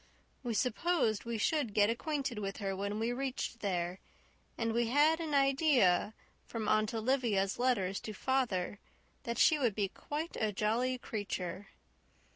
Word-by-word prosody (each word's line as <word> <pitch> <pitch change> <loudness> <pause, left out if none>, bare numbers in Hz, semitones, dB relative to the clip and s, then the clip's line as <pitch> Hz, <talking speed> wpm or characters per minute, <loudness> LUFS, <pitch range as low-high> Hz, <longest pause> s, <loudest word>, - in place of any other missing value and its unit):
We 240 -3 -3
supposed 250 - +1
we 235 -1 -2
should 240 -2 0
get 210 +1 +5
acquainted 270 -2 -2
with 195 -1 -4
her 195 -2 -2
when 200 +2 -3
we 230 +2 0
reached 260 -2 -3
there, 180 -3 -2 0.6
and 230 -1 0
we 235 0 +1
had 295 +6 +4
an 315 -3 -2
idea, 275 - +3 0.3
from 225 -2 -4
Aunt 215 0 +2
Olivia's 220 -5 +1
letters 200 -7 +1
to 215 - -7
father, 210 -6 -1 0.5
that 235 0 -2
she 310 +4 +5
would 240 -7 +1
be 200 -2 0
quite 300 - -5
a 215 -1 0
jolly 230 +5 0
creature. 195 -4 -4
230 Hz, 150 wpm, -33 LUFS, 205-265 Hz, 0.6 s, get